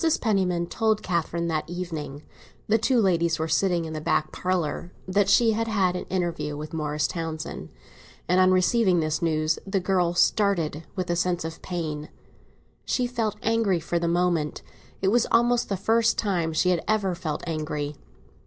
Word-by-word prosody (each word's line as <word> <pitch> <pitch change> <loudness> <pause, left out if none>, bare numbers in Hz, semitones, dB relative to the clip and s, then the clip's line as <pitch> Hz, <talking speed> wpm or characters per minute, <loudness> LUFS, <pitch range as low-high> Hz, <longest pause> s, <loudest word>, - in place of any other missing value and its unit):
PENNIMAN 185 -6 +1
told 220 +2 0
Catherine 170 -1 -1
that 155 0 -2
evening—the 165 +3 -4
two 245 +3 +2
ladies 170 -5 +2
were 160 0 -2
sitting 170 +1 +1
in 160 - -6
the 155 - -4
back 155 0 0
parlour—that 185 +3 -1
she 225 +2 +5
had 225 +1 -1
had 190 -5 +1
an 180 - -4
interview 170 -5 -2
with 155 +2 -7
Morris 150 -1 -1
Townsend; 160 -2 -4 0.6
and 180 +1 +3
on 185 - +5
receiving 185 0 +3
this 155 +1 -1
news 155 -1 +1
the 195 0 +1
girl 180 -2 +1
started 175 -6 +1
with 185 -2 -2
a - - +1
sense 175 -1 0
of 165 0 -7
pain. 155 -4 -4 0.7
She 250 - 0
felt 230 -4 -2
angry 225 -5 +2
for 170 +2 -1
the 170 - -1
moment; 170 -3 0 0.4
it 190 - +4
was 235 +2 +3
almost 240 +1 +3
the 200 - -1
first 225 +3 +2
time 175 -6 0
she 180 +3 +2
had 170 -2 0
ever 205 -3 +1
felt 170 -4 -4
angry. 150 -2 -3
175 Hz, 165 wpm, -25 LUFS, 160-200 Hz, 0.7 s, she